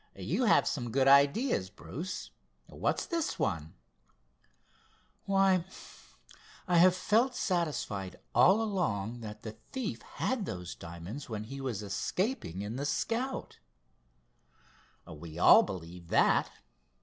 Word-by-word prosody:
"You 250 - -1
have 215 - +4
some 120 -5 -2
good 130 +3 +2
ideas, 140 - +4
Bruce—what's 160 - -5
this 335 -3 -2
one?" 80 -3 -2 1.5
"Why, 195 -2 +3 1.0
I 175 -1 +3
have 180 +2 +6
felt 225 +7 +2
satisfied 150 - -2
all 205 +5 +5
along 120 - -2
that 105 -2 -9
the 110 -1 -7
thief 260 -5 -4
had 245 -7 -3
those 90 -1 -5
diamonds 85 - -8
when 110 -2 -4
he 135 +5 -7
was 120 -6 -3
escaping 100 - -2
in 110 +4 -5
the 140 - -2
Scout." 245 - -2 1.5
"We 80 +1 -10
all - - +8
believe 90 -2 -7
that. - - +3
135 Hz, 115 wpm, -31 LUFS, -, 1.5 s, all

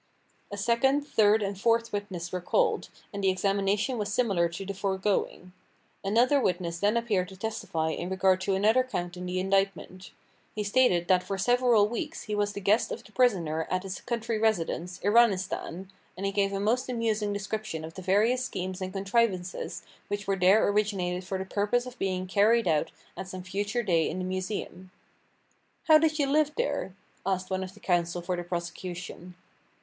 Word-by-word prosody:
A 205 - -5
second, 265 +7 +2
third 215 -3 +4
and 200 0 -2
fourth 230 0 +2
witness 190 -4 -4
were 180 - -3
called, 445 - +1 0.2
and 200 0 -4
the 190 - +4
examination 200 +5 0
was 205 0 -2
similar 195 -7 +2
to 170 +3 -6
the 200 - -4
foregoing. 190 -2 -1 0.5
Another 240 +8 +3
witness 175 -4 -1
then 205 +4 +2
appeared 205 -6 0
to 190 - -12
testify 190 -7 -2
in 175 +2 -4
regard 190 0 +2
to 195 0 0
another 220 +6 +4
count 175 -8 -4
in 180 0 -6
the 180 +1 -1
indictment. 190 -1 -1 0.5
He 210 - -1
stated 205 -5 +3
that 185 -2 +4
for 195 +1 -4
several 240 0 +4
weeks 295 +8 -4
he 215 - -5
was 205 0 0
the 200 - -5
guest 205 +4 +2
of - - -5
the - - -17
prisoner 180 -10 +1
at 185 0 -1
his 190 -1 -6
country 230 -2 -2
residence, 180 -4 0
Iranistan, 195 -4 +2 0.3
and 195 - -4
he 195 - 0
gave 195 0 +1
a 195 - -2
most 240 +6 0
amusing 220 -3 0
description 205 -5 -4
of 160 - -9
the 185 - -8
various 215 +7 +2
schemes 185 -5 -4
and 185 0 -3
contrivances 195 -2 -1 0.2
which 205 0 -3
were 195 0 +1
there 190 +3 +4
originated 195 -3 0
for 190 - -3
the 190 - -4
purpose 210 +5 0
of 250 0 -10
being 185 -1 -1
carried 210 +3 +3
out 155 -3 +2 0.3
at 190 - -6
some 185 -1 -7
future 200 +5 -2
day 170 -6 +2
in 170 - -4
the 185 - -3
Museum. 185 0 -4 0.9
"How 310 -1 +7
did 315 -1 +1
you 290 - +2
live 300 +2 +2
there?" 475 - -2 0.3
asked 185 0 -2
one 190 0 -1
of 190 0 -8
the - - -15
counsel 175 -1 0
for 180 +1 -1
the 175 - -4
prosecution. 175 0 -6
195 Hz, 185 wpm, -28 LUFS, 185-220 Hz, 0.9 s, How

